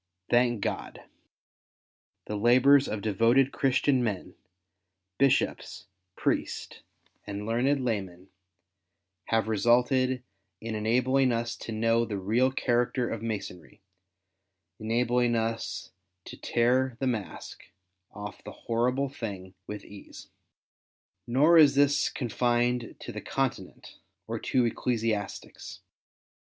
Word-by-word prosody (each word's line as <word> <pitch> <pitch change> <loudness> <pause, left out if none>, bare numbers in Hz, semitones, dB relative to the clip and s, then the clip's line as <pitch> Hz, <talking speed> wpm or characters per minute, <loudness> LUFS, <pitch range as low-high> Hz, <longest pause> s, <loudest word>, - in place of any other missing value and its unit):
Thank 120 -2 +3
God! - - -4 1.2
the 105 - -4
hibours 130 +5 +5
of 105 -2 -4
devoted, 115 +6 +3
Christian 135 -1 +2
men 100 -5 -3 0.4
— 95 0 -56
bisliops, 135 -1 +1 0.3
priests, - - -2 0.5
and 100 0 -5
learned 115 +4 0
hiymen 95 -8 -4 0.5
— 90 +1 -55
have 110 -2 0
resulted 125 +4 +2 0.4
in 115 0 -5
enabling 125 +5 +2
us 115 0 -2
to - - -7
know 115 +1 +2
the 105 -3 -4
real 115 +7 +1
character 125 -1 0
of 115 - -4
Masonry, 105 -2 -6 1.0
and 110 0 -5
enabling 120 0 +2
us 110 -4 -3 0.3
to - - -9
^'tear 125 +1 +1
the 135 - -2
mask 115 -6 -4 0.3
" 90 0 -52
off 105 +1 -9
the - - -8
horrible 125 +4 -1
thing 100 -8 -7
with 105 -1 -7
ease. 100 -1 -13 1.0
Nor 150 +8 +5
is 145 -3 +6
this 145 +1 +3
confined 120 -1 -1
to - - -7
the - - -6
Continent - - -4 0.3
or - - -4
to 125 -2 +1
ecclesiastics. 115 -3 -3
115 Hz, 115 wpm, -28 LUFS, 105-125 Hz, 1.2 s, is